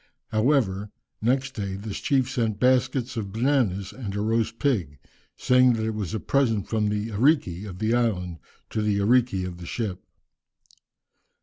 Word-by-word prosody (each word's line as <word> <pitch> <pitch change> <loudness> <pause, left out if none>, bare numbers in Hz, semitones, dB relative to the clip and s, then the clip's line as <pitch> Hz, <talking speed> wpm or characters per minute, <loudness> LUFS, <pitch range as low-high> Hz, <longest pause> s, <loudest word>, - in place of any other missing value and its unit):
However, 110 -4 +1 0.3
next 130 +4 +1
day, 100 -5 -4
this 100 +1 -5
chief 135 -3 +1
sent 115 -6 -1
baskets 130 0 +2
of 100 -3 -3
bananas 110 -5 0
and 105 -6 -6
a 105 - -1
roast 110 +1 0
pig, 95 - 0 0.4
saying 125 0 +4
that 110 -1 -1
it 110 - -1
was 105 -3 -3
a - - -1
present 115 -7 +1
from 110 -2 0
the 105 +1 -2
"ariki" 105 - +1
of 90 - -8
the 110 +3 0
island 90 -8 0 0.3
to 110 - -1
the 105 -1 +1
"ariki" 105 -2 +2
of 90 -1 -6
the 85 - -8
ship. 100 -3 -3
110 Hz, 165 wpm, -25 LUFS, 100-125 Hz, 0.4 s, saying